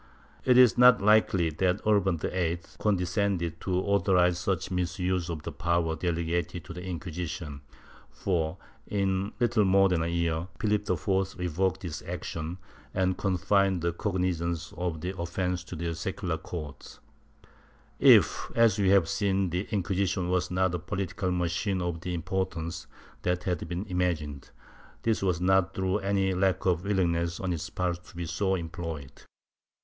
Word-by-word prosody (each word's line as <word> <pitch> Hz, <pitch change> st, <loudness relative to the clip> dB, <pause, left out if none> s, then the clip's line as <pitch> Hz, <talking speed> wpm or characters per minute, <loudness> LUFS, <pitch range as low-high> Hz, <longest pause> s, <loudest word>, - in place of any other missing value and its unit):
It 125 Hz, -1 st, +5 dB
is 125 Hz, -4 st, +6 dB
not 125 Hz, -3 st, +8 dB
likely 100 Hz, -5 st, +4 dB
that 90 Hz, +5 st, +1 dB
Urban 100 Hz, -4 st, +3 dB
VIII 85 Hz, +1 st, -1 dB, 0.2 s
condescended 95 Hz, -3 st, 0 dB
to 95 Hz, -, -1 dB
authorize 90 Hz, -3 st, +3 dB
such 95 Hz, 0 st, -1 dB
misuse 90 Hz, 0 st, -1 dB
of 80 Hz, -3 st, -4 dB
the -, -, -5 dB
power 85 Hz, 0 st, 0 dB
delegated 85 Hz, 0 st, -2 dB
to 90 Hz, -, -8 dB
the 90 Hz, +1 st, -7 dB
Inquisition 85 Hz, -4 st, -5 dB, 0.5 s
for, 85 Hz, -2 st, -1 dB, 0.3 s
in 95 Hz, 0 st, 0 dB
little 120 Hz, -3 st, +3 dB
more 95 Hz, 0 st, +5 dB
than 90 Hz, -3 st, +1 dB
a 80 Hz, -, 0 dB
year, 85 Hz, 0 st, -1 dB
Phihp 105 Hz, -1 st, 0 dB, 0.4 s
IV -, -, -16 dB
revoked 90 Hz, +2 st, -1 dB
this 85 Hz, -5 st, -5 dB
action 85 Hz, +2 st, -5 dB, 0.4 s
and 95 Hz, 0 st, +2 dB
confined 95 Hz, -1 st, +1 dB
the 85 Hz, -1 st, +1 dB
cognizance 85 Hz, -3 st, -2 dB
of 85 Hz, -2 st, -3 dB
the 90 Hz, +2 st, -3 dB
offence 90 Hz, +1 st, -2 dB
to 90 Hz, -, -7 dB
the 85 Hz, +1 st, -3 dB
secular 85 Hz, -1 st, -3 dB
courts.^ 75 Hz, -5 st, -8 dB, 1.0 s
If, -, -, +5 dB
as 115 Hz, -3 st, +4 dB
we 95 Hz, -2 st, +3 dB
have 95 Hz, -4 st, +5 dB
seen, 95 Hz, -2 st, 0 dB
the 90 Hz, +4 st, -2 dB
Inquisition 95 Hz, -3 st, 0 dB
was 90 Hz, -1 st, +1 dB
not 90 Hz, 0 st, +1 dB
a 90 Hz, -, -1 dB
political 95 Hz, -1 st, -3 dB
machine 90 Hz, +2 st, 0 dB
of 85 Hz, -2 st, -3 dB
the 90 Hz, 0 st, -3 dB
importance 85 Hz, -1 st, -3 dB, 0.3 s
that 90 Hz, 0 st, -1 dB
has 90 Hz, -2 st, 0 dB
been 90 Hz, +4 st, -4 dB
imagined, 85 Hz, -7 st, -2 dB, 0.5 s
this 115 Hz, -1 st, +1 dB
was 90 Hz, -4 st, +1 dB
not 95 Hz, +1 st, +2 dB
through 95 Hz, +2 st, 0 dB
any 95 Hz, -1 st, +1 dB
lack 95 Hz, 0 st, +1 dB
of 90 Hz, -1 st, +1 dB
willingness 85 Hz, -4 st, 0 dB
on 95 Hz, -2 st, -1 dB
its 80 Hz, -, -4 dB
part 90 Hz, -1 st, -2 dB
to -, -, -16 dB
be 85 Hz, 0 st, -4 dB
so 95 Hz, +4 st, 0 dB
employed. 80 Hz, -4 st, -5 dB
90 Hz, 155 wpm, -28 LUFS, 85-95 Hz, 1.0 s, not